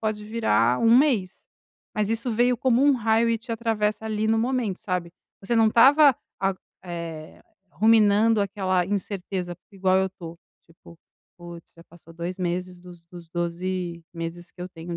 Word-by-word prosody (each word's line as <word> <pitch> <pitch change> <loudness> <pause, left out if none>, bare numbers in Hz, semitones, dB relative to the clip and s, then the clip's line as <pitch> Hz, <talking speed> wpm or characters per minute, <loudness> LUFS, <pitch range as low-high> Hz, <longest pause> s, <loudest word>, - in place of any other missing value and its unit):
pode 215 -1 -3
virar 210 - +1
1 230 +1 +5
mês. 245 -10 +1 0.5
Mas, 215 0 0
isso 230 +2 -1
veio 240 +2 +2
como 250 +1 +2
um 290 - +5
raio 230 -1 +2
e 230 - 0
te 230 +2 -12
atravessa, 220 -2 -1
ali, 215 0 -1
no 225 - +2
momento, 235 -5 -1
sabe. 180 -5 -3 0.3
Você 230 +4 -1
não 225 -1 +5
estava 275 +5 +6 0.3
a 195 0 +1 0.3
eh, 165 -3 -8 0.3
ruminando 220 0 +4
aquela 185 -2 0
incerteza 190 -2 -4 0.2
igual 190 -1 +1
eu 190 0 0
tô, 170 -3 -10 0.3
tipo: 165 0 -18 0.4
"Putz, 175 -1 -12
já 165 - -16
passou 165 0 -18
2 170 +2 -5
meses 180 0 -3
dos 175 -1 -14
dos 170 -1 -13
12 175 0 -4
meses 170 +1 -7
que 180 - -16
eu 180 - -6
tenho 170 0 -7
190 Hz, 165 wpm, -24 LUFS, 175-225 Hz, 0.5 s, estava